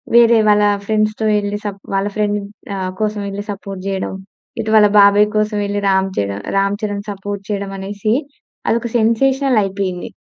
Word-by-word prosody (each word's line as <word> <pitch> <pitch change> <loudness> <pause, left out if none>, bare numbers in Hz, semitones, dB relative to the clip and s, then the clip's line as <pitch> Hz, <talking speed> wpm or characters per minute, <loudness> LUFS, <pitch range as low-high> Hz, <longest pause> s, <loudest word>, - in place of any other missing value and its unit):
వేరే 235 -1 +7
వాళ్ళ 210 0 +5 0.2
ఫ్రెండ్స్‌తో 215 +1 0
వెళ్లి 205 0 -1
స‌ప్ 200 -1 -5
వాళ్ళ 195 +1 +1
ఫ్రెండ్‌ని 210 -1 0 0.3
ఆహ్, 185 -1 -3
కోసం 215 0 -1
వెళ్లి 200 +1 -5
సపోర్ట్ 195 -1 -7
చేయడం. 190 -1 -2 0.5
ఇటు 220 - -2
వాళ్ళ 210 -1 +7
బాబాయ్ 205 +1 +6
కోసం 215 0 +1
వెళ్లి 205 0 -2
రామ్ 190 0 +2
చర 100 0 -1 0.3
రామ్ 200 +1 +2
చరణ్ 205 -1 -3
సపోర్ట్ 200 0 -6
చేయడం 200 -1 -3
అనేసి, 200 +2 -3 0.6
అదొక 235 +1 +1
సెన్సేషనల్ 260 +3 +2
అయిపోయింది. 190 -2 -3
205 Hz, 160 wpm, -18 LUFS, 195-215 Hz, 0.6 s, వేరే